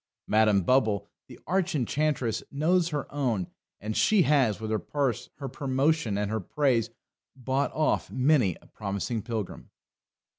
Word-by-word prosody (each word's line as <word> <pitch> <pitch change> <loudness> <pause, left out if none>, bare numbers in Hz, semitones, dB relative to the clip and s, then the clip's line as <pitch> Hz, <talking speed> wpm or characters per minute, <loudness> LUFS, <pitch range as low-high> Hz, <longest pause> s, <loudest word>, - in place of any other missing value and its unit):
Madam 105 -3 +3
Bubble, 105 -3 +2 0.2
the 125 - -13
arch 185 -2 0
enchantress, 130 -3 0
knows 170 +4 +2
her 150 -3 -2
own, 120 -10 0 0.3
and 105 +1 -4
she 210 -4 +4
has, 135 -10 +2
with 110 0 -4
her 110 - +1
purse, 135 -4 -2
her 140 - -6
promotion, 135 -2 0
and 105 0 -1
her 110 - 0
praise, 120 +1 +1 0.5
bought 135 +2 -1
off 155 -1 0
many 130 - +2
a - - -20
promising 105 +3 -3
pilgrim. 110 -3 -5
130 Hz, 145 wpm, -27 LUFS, 110-145 Hz, 0.5 s, she